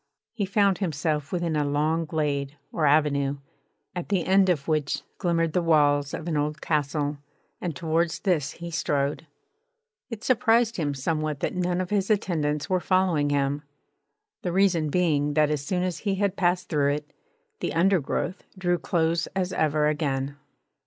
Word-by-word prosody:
He 205 -4 -2
found 200 -1 +2
himself 155 -4 -1
within 175 -3 -1
a 150 - +2
long 155 +3 0
glade 145 -2 -2
or 155 -3 +1
avenue, 140 -1 +2 0.6
at 175 - -4
the 190 -4 +1
end 190 0 +4
of 155 -6 0
which 145 -3 0 0.2
glimmered 165 -3 +1
the 180 - +2
walls 145 -3 +3
of 165 - -7
an 165 - -1
old 150 +1 -1
castle; 145 -1 -1 0.4
and 170 -4 -3
towards 165 +1 0
this 155 -8 0
he 170 0 -8
strode. 150 -2 -1 0.8
It 230 -3 -7
surprised 235 -2 +3
him 145 -4 -1
somewhat 155 +1 -2
that - - -1
none 180 0 0
of 185 +1 -3
his 200 -1 +1
attendants 150 -8 0
were 185 -1 +1
following 180 -6 +2
him; 140 0 0 0.8
the 180 - -2
reason 175 -4 +2
being 150 -4 +1
that 150 -1 +3
as 150 -2 -1
soon 180 +4 -1
as 180 -2 -2
he 200 -2 -1
had 200 -1 0
passed 180 -1 +1
through 145 -3 +2
it, 150 0 -6 0.5
the - - -2
undergrowth 180 0 +1
drew 175 -2 +1
close 165 -1 0
as 190 -1 -1
ever 155 -2 +2
again. 145 -2 -1
160 Hz, 165 wpm, -26 LUFS, 145-180 Hz, 0.8 s, end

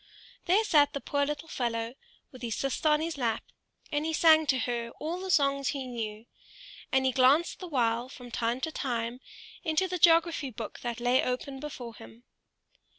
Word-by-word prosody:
There 390 +5 +4
sat 300 -9 +4
the 280 - -2
poor 285 0 0
little 295 +2 -4
fellow, 230 -4 -2 0.4
with 255 - -13
his 230 -3 -2
sister 275 +3 0
on 300 0 +3
his 325 -3 -3
lap, 230 -3 0 0.5
and 295 0 0
he 320 +1 -1
sang 315 -1 +5
to 265 - +3
her 235 -1 -2
all 330 +4 -3
the 380 0 -6
songs 275 -4 +2
he 275 -3 -2
knew; 225 -3 -5 0.7
and 265 0 +3
he 260 - +3
glanced 265 +6 +3
the 365 - -6
while 240 -4 0
from 245 -2 -11
time 235 +2 -1
to 320 - -2
time 240 -4 -3 0.4
into 320 +2 +1
the 365 -1 -3
geography 330 -3 +4
book 225 -2 -7
that 240 -1 -4
lay 245 +2 +3
open 265 +2 -3
before 260 -5 -7
him. 115 - -14
265 Hz, 185 wpm, -29 LUFS, 240-310 Hz, 0.7 s, sang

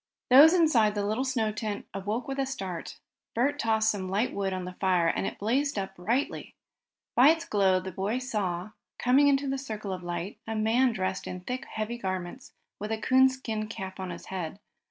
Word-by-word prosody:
Those 300 +7 +9
inside 240 -12 +4
the 205 -1 -1
little 215 +5 0
snow 245 -5 0
covered 210 - -7
tent 210 -2 -3
awoke 205 +5 -3
with 270 0 -4
a 270 - +2
start. 190 -11 -5 0.4
Bert 280 +5 +1
tossed 220 -1 +2
some 190 -3 -4
light 205 +6 0
wood 195 -1 -1
on 185 -1 -3
the 180 - -6
fire 185 -2 +2
and 180 - 0
it - - -5
blazed 260 +6 0
up 195 -1 -3
brightly. 230 +10 -2 0.6
By 255 +4 +7
its 325 +1 +2
glow 190 -3 +3
the 190 +1 -6
boy 195 +6 -1
saw, 210 -7 -3 0.3
coming 265 +4 +4
into 280 0 +2
the 270 0 -1
circle 215 -7 -5
of 185 - -6
light, 175 +2 -5
a 225 - -3
man 230 +4 +3
dressed 185 -3 -3
in 180 - -6
thick, 250 +7 -4
heavy 220 +2 -4
garments, 185 +4 -5 0.3
with 210 +2 -4
a 220 - 0
coonskin 260 -3 +2
cap 190 -3 -7
on 185 -1 -4
his 170 - -8
head. 185 0 -5
215 Hz, 200 wpm, -28 LUFS, 190-255 Hz, 0.6 s, Those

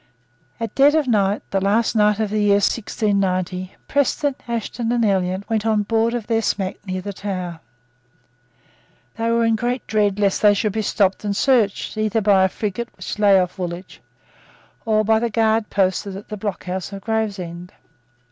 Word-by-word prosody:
At 230 -1 -4
dead 285 +2 +5
of 305 -4 +1
night, 205 -3 +1
the 195 - 0
last 215 +4 +1
night 210 -1 +3
of 215 -2 -1
the 215 0 0
year 205 -1 +4
1690, 195 -3 -1
Preston, 285 +1 +1
Ashton 235 0 -3
and 240 -1 +2
Elliot 190 -1 0
went 220 -2 0
on 215 -2 +1
board 225 +2 +1
of 235 -3 -4
their 225 0 +1
smack 195 -2 -2
near 185 0 -3
the 200 +2 -6
Tower. 185 -4 -5 1.6
They 230 0 -1
were 230 0 +2
in 225 0 +3
great 245 +2 -2
dread 205 -2 +1
lest 200 -2 +1
they 205 -1 +6
should 210 0 -1
be 220 - -1
stopped 200 -2 +1
and 205 -1 -1
searched, 230 -6 +1
either 215 +1 +1
by 200 -2 +4
a - - +1
frigate 220 +4 -4
which - - -6
lay 200 -2 +6
off 180 +1 -2
Woolwich, 175 +1 -6 0.8
or 215 -1 +2
by 220 +1 +3
the 235 +1 -1
guard 220 0 +1
posted 190 0 0
at 205 - -12
the 215 - -4
blockhouse 190 -3 -4
of 195 0 -7
Gravesend. 195 -5 -3
210 Hz, 175 wpm, -21 LUFS, 195-225 Hz, 1.6 s, they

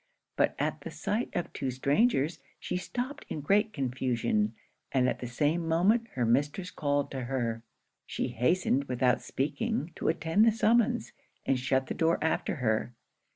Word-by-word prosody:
But - - +2
at - - -1
the - - -6
sight 225 +4 -2
of 175 - -2
two 135 - -2
strangers, 145 - +1 0.2
she - - -4
stopped 245 +9 -4
in - - -3
great 205 +8 +2
confusion; 120 - 0 0.4
and 130 -2 +3
at - - -1
the 125 - -5
same 150 +7 0
moment 200 +8 +3
her 125 -2 +1
mistress 145 +10 +1
called 145 -1 0
to 130 -2 -4
her. 120 -3 -2 0.5
She - - -2
hastened, 140 +1 +1
without 125 -1 +1
speaking, 155 - -2
to - - -2
attend 165 +5 +2
the 225 - +6
summons; 235 +2 +2 0.3
and 135 - +2
shut 130 +1 +1
the - - -4
door 165 +1 +2
after 160 +2 0
her. 120 -3 -1
145 Hz, 160 wpm, -29 LUFS, 125-185 Hz, 0.5 s, the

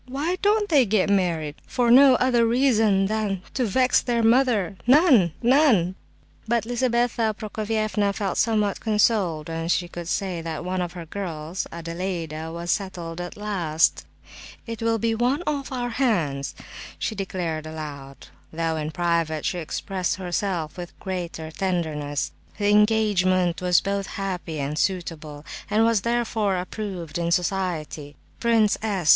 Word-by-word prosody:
Why 290 +8 -1
don't 415 +1 +3
they 280 -8 +4
get 200 -1 +2
married? 165 -6 0
For 240 -2 +1
no 265 +1 +8
other 245 -2 +3
reason 225 -6 +3
than 200 -3 -1
to 255 - 0
vex 255 +5 +3
their 235 -2 0
mother—none—none!" 235 - +3 0.5
But 235 0 +1
Lizabetha 240 -2 +1
Prokofievna 215 -1 -1
felt 200 -2 -2
somewhat 210 -3 +1
consoled 210 -8 +1
when 165 0 -3
she 175 +1 +1
could 175 -1 -7
say 185 -2 -2
that 165 +1 -5
one 185 0 -1
of 175 -1 -4
her 175 -2 -7
girls, 165 -1 -5
Adelaida, 165 -2 -4
was 170 +1 -3
settled 175 -4 -3
at 175 +2 -7
last. 180 -7 +1 0.6
"It 230 -2 -6
will 225 0 +2
be 225 +1 0
one 250 +8 +1
off 285 -3 -2
our 245 -2 -2
hands!" 175 - 0 0.4
she - - -2
declared 175 -6 -3
aloud, 145 -3 -8 0.2
though 165 0 -1
in 155 0 -3
private 165 -1 0
she 180 - -1
expressed 180 +3 -2
herself 180 -3 -3
with 175 -1 -8
greater 175 -4 -5
tenderness. 155 -6 -2 0.3
The 205 -1 +1
engagement 205 -5 +3
was 180 -1 +4
both 200 0 -2
happy 180 -5 -4
and 145 +2 -2
suitable, 160 -5 -3 0.2
and 215 +2 +3
was 230 -3 +3
therefore 225 -4 0
approved 180 -3 -5
in 170 0 0
society. 170 -5 -2 0.2
Prince 225 -3 +3
S. 195 -7 -1
190 Hz, 140 wpm, -24 LUFS, 170-225 Hz, 0.6 s, no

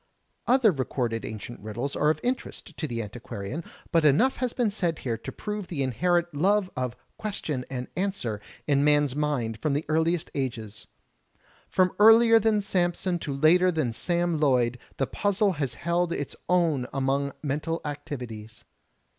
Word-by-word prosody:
Other 245 -4 +5
recorded 125 -5 -2
ancient 110 +2 -7
riddles 115 +7 -4
are 150 - +3
of 155 - +1
interest 250 +1 -3
to 155 - -3
the 115 -3 -3
anti 105 +4 -8
quarian, 115 +7 -6 0.3
but 165 -1 +3
enough 155 - +4
has 250 -2 -1
been 235 -4 0
said 175 -6 -1
here 120 -3 -2
to - - -7
prove 210 -3 -5
the 145 -6 -2
inherent 175 +7 +1
love 190 +5 +2
of 125 -1 -2 0.2
Question 155 -11 -3
and 125 -1 -4
Answer 180 - -2 0.2
in 140 -1 +2
man's 145 -2 +3
mind 135 -7 -1
from 150 +3 0
the 145 +2 -1
earliest 160 +2 +1
ages. 115 -6 -4 0.8
From 185 -1 +3
earlier 225 +1 +8
than 215 -1 +2
Samson 180 -2 0
to 145 - -4
later 165 +6 +4
than 155 -9 -1
Sam 175 +2 0
Loyd 125 -4 +2 0.2
the 135 - +1
puzzle 205 - +1
has 145 -8 -3
held 170 0 0
its 145 -4 -4
own 165 -8 +2
among 140 +1 0
mental 150 +3 -2
activities. 125 -7 -7
150 Hz, 160 wpm, -27 LUFS, 125-180 Hz, 0.8 s, earlier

